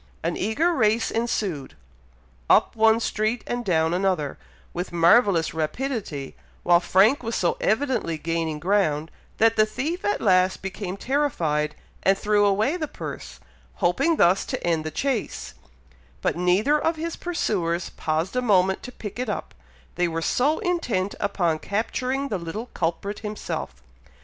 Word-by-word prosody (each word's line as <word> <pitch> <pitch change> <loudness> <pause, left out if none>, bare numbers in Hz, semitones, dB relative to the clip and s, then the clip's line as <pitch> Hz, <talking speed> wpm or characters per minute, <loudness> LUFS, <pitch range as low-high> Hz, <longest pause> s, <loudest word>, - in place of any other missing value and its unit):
An 170 +1 -1
eager 270 - +1
race 225 -5 +2
ensued, 205 - -2 0.7
up - - +4
one 220 0 +4
street, 220 +1 -1
and 240 0 -3
down 160 -4 +1
another, 180 -6 0 0.3
with 180 +1 -4
marvellous 175 0 +4
rapidity, 160 - -3 0.3
while 175 0 +5
Frank 195 +10 +4
was 230 -1 -3
so 175 - +1
evidently 220 - 0
gaining 165 -1 -2
ground, 160 -3 +1 0.3
that 225 0 +3
the 215 - +6
thief 310 - -3
at 415 - 0
last 185 -2 +2
became 195 0 -5
terrified, 170 - 0 0.3
and 195 0 +3
threw 205 0 +2
away 215 - +1
the 310 -3 -3
purse, - - -8 0.4
hoping 335 0 +2
thus 185 - +4
to - - -5
end 165 -2 +1
the 155 - -3
chase; 250 - -2 0.7
but - - +1
neither 190 - +2
of 325 - +1
his 330 +1 -4
pursuers 180 - -1
paused 160 +7 -2
a 250 - +2
moment 190 -5 +3
to 250 - -8
pick 215 -2 -8
it 250 -3 -2
up, 205 - -4 0.4
they 175 - +1
were 165 -1 -2
so 275 - +1
intent 245 - -1
upon 175 -6 0
capturing 255 - -2
the 200 - -2
little 175 +8 -6
culprit 180 +5 -2
himself. 205 - -5
200 Hz, 150 wpm, -24 LUFS, 170-240 Hz, 0.7 s, the